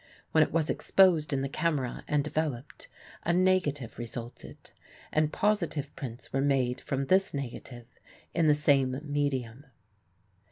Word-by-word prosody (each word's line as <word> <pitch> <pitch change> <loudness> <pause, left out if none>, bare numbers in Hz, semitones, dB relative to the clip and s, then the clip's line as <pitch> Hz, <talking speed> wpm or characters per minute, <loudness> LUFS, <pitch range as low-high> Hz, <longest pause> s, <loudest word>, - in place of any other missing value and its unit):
When 160 - +4
it - - -3
was 160 -1 +1
exposed 175 -6 +3
in 135 -1 0
the - - -1
camera 145 -3 -2
and 150 -1 +1
developed, 150 -3 -4 0.4
a 170 - +1
negative 170 -11 +1
resulted, 120 0 -8 0.4
and 155 0 +2
positive 170 -9 -1
prints 125 -4 -8
were 135 - +1
made 135 -3 +1
from 135 0 -2
this 190 +1 +2
negative 125 -2 -6 0.5
in 165 -2 +2
the 150 - +5
same 135 -3 +2
medium. 140 -3 -2
145 Hz, 135 wpm, -29 LUFS, 130-155 Hz, 0.5 s, the